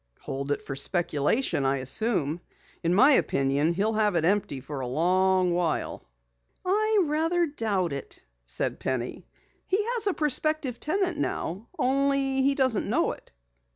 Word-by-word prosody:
"Hold 140 +1 -4
it - - -1
for 135 - -5
speculation, 150 - 0
I 135 +1 +1
assume. 160 - +1 0.4
In 170 - 0
my 260 +11 +6
opinion 140 - +2
he'll 205 +5 0
have 210 -3 +1
it 165 -1 +2
empty 185 -7 0
for 140 +2 -7
a 130 - -3
long 185 +5 +2
while." 170 -2 -1 0.6
"I 430 +3 +2
rather 325 +3 +1
doubt 210 - -1
it," 140 - -7 0.2
said 60 0 -2
Penny. 130 -2 -4 0.4
"He 380 - +2 0.2
has 460 -4 -1
a 395 - +1
prospective 300 -3 0
tenant 355 0 -1
now, 200 - -3
only 275 0 +1
he 275 +1 +2
doesn't 260 -6 +1
know - - +1
it." - - -12
205 Hz, 150 wpm, -27 LUFS, -, 0.6 s, my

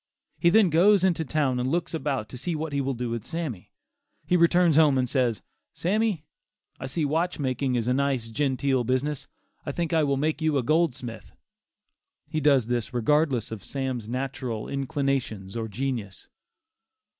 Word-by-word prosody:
He 170 - +5
then 195 -1 +5
goes 190 +4 +5
into 175 -4 +2
town 140 -4 0
and 125 +1 0
looks 170 +3 -1
about 135 -8 -2
to 125 - -8
see 170 +5 -2
what 155 -1 -4
he 140 - +1
will 135 0 -2
do 120 0 -3
with 115 -2 -3
Sammy. 155 - -5 0.6
He 180 - +2
returns 170 -1 +4
home 150 -3 +5
and 130 -1 +1
says 120 -5 0 0.3
"Sammy, 200 -3 0 0.5
I 135 - -5
see 150 +4 -1
watch 165 +5 0
making 130 -2 -1
is 120 -1 -1
a 125 - +3
nice, 130 -4 0
genteel 135 0 +1
business; 130 +4 -1 0.4
I - - -3
think 170 -1 -2
I 160 -1 +4
will 140 -1 +1
make 155 +2 -1
you 155 -2 +2
a 130 - +1
goldsmith." 135 -5 -1 0.9
He 155 - -2
does 140 -5 +4
this 120 +1 -2
regardless 130 -1 +1
of 110 -4 -6
Sam's 130 -5 -3
natural 125 -3 -3
inclinations, 135 -8 -2
or 115 -1 -2
genius. 115 -3 -4
135 Hz, 170 wpm, -26 LUFS, 125-160 Hz, 0.9 s, He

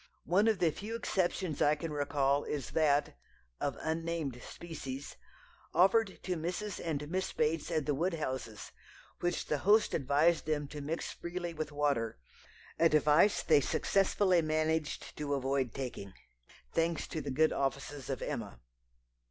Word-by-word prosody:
One 200 +5 +3
of 220 -2 +3
the 170 -3 +3
few 215 +8 -6
exceptions 185 -7 -1
I 150 +1 +5
can 160 0 -5
recall 145 -1 +1
is 145 -3 -4
that 150 - +2 0.4
of - - -2
unnamed 160 -5 -2
species 145 -5 -7 0.6
offered 195 +2 +3
to 180 - -1
Mrs. 175 +5 -3
and 150 -3 -2
Miss 185 +1 -1
Bates 155 0 0
at 155 -4 0
the 150 - +1
Woodhouses', 135 - -3 0.5
which 175 0 -1
the 150 - -1
host 210 +7 +4
advised 155 +4 +2
them 150 -2 0
to 150 0 -7
mix 155 +4 -3
freely 175 0 -5
with 155 -1 -4
water, 140 -6 0 0.6
advice 155 +4 +4
they 150 -3 +5
successfully 190 +3 +2
managed 155 0 -1
to 145 -1 -1
avoid 135 -2 0
taking, 120 -7 -6 0.6
thanks 165 0 +1
to 160 - -3
the 140 - -5
good 155 +4 +3
offices 140 0 -3
of 135 -3 -3
Emma. - - -4
155 Hz, 145 wpm, -32 LUFS, 140-170 Hz, 0.6 s, I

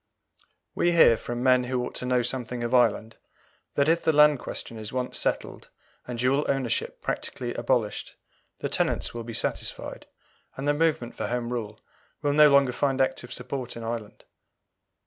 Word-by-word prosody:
We 175 0 +2
hear, 160 -8 +7
from 120 +2 -5
men 125 -1 +4
who 125 0 -1
ought - - -7
to 125 - -4
know 125 -1 +2
something 120 -1 -3
of 120 +1 -2
Ireland, 115 -2 +2 0.6
that 140 0 +3
if 165 +1 +3
the - - +3
Land 150 -2 +5
question 115 -2 -6
is 110 -1 -5
once 125 0 -2
settled, - - -2 0.4
and 125 -1 -5
dual 130 +4 +2
ownership 135 -4 -1
practically - - -3
abolished, - - -1 0.5
the - - -1
tenants - - 0
will 120 -1 -5
be 115 0 -7
satisfied, - - -3 0.5
and 135 +2 -3
the 145 - +4
movement 150 -6 0
for - - -4
Home 120 0 -2
Rule 110 -3 -5 0.4
will 145 -1 +2
no 150 0 +7
longer 140 -2 +5
find 135 +1 0
active 130 -2 0
support 125 -2 -5
in 115 - -7
Ireland. 115 -2 -5
125 Hz, 170 wpm, -26 LUFS, 120-140 Hz, 0.6 s, hear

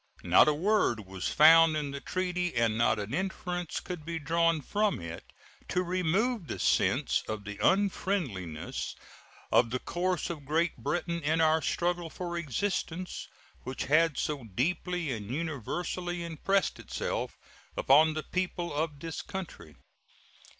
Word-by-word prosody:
Not - - +6
a 150 - +4
word 165 - +1
was 95 -1 -4
found 160 +1 +7
in 145 -2 -2
the 140 0 -6
treaty, 180 -1 -2
and 115 -2 +2
not 115 -1 +3
an 105 +3 -4
inference 180 -1 -2
could 180 -4 -6
be 165 +1 -4
drawn 165 +1 +2
from 205 +6 0
it, 85 -1 -7 0.4
to 180 +1 0
remove 185 +4 0
the - - -4
sense - - +2
of 110 -1 -4
the 105 0 -7
unfriendliness 155 - 0 0.6
of 120 -1 +5
the 125 - -1
course 175 +5 -1
of 155 -4 -7
Great 160 +4 +1
Britain 170 +3 -2
in 160 +2 +1
our 160 0 +4
struggle 175 0 -1
for 175 +1 -5
existence, 175 - -2 0.3
which 130 - -4
had 160 +1 +3
so 150 -5 -2
deeply 165 - -1
and 105 -4 -5
universally 170 - -3
impressed 175 +4 0
itself - - -3 0.4
upon 155 +3 +5
the 155 - -2
people 180 -2 -2
of 150 -1 -2
this 165 -1 -4
country. 170 - -7
165 Hz, 145 wpm, -30 LUFS, 140-180 Hz, 0.6 s, found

